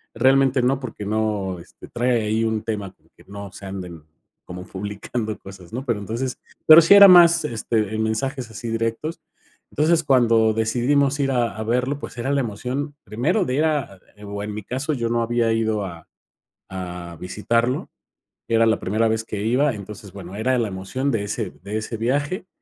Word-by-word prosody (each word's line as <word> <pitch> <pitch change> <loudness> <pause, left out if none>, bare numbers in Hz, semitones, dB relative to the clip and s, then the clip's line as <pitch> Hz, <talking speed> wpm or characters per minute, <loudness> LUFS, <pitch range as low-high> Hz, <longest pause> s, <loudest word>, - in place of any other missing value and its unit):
realmente 135 -1 +3
no 130 +2 +2
porque 115 -6 -7
no, 105 -4 -1
este, 85 - -14
trae 120 -1 0
ahí 110 +1 0
un 110 -1 -1
tema 105 -4 -4
como - - -33
que - - -19
no 100 0 -8
se 100 - -11
anden 90 -4 -7 0.4
como 90 0 -8
publicando 105 +3 -5
cosas, 95 -3 -12
¿no?, 125 +4 -5
pero 115 -5 -1
entonces 115 +5 -4 0.3
pero 160 +1 +11
sí 165 +5 +6
era 200 0 +11
más 175 -3 +7
este, 110 -4 -1
eh, - - -2
mensajes 115 +3 -2
así 115 +1 -7
directos. 115 +8 -2 0.5
Entonces, 160 +2 +2
cuando 115 -5 +4
decidimos 130 +6 +1
ir 135 -1 +1
a 115 -4 -1
verlo, 125 +5 0
pues - - -9
era 125 +3 -2
la 140 - +2
emoción 125 +6 -4
primero 160 - 0
de 125 - -2
ir 150 - +2
a 140 -12 -1 0.3
o 100 0 -5
en 105 - -5
mi 105 0 -6
caso, 135 +9 -3
yo 120 -4 -1
no 120 0 +1
había 115 -1 +1
ido 110 -2 0
a 85 -3 -9 0.6
a 90 -2 -7
visitarlo, 115 +7 -1 0.6
era 115 0 +3
la 110 - +3
primera 110 +4 0
vez 110 0 -1
que 105 -2 -5
iba. 125 +4 +2
Entonces, 100 -1 -9
bueno, 95 0 -9
era 130 +4 +1
la 115 -3 0
emoción 100 +9 -3
de 110 -5 -1
ese 105 -1 -3
de 105 +2 -3
ese 110 +1 -5
viaje 145 - -1
115 Hz, 185 wpm, -22 LUFS, 105-130 Hz, 0.6 s, pero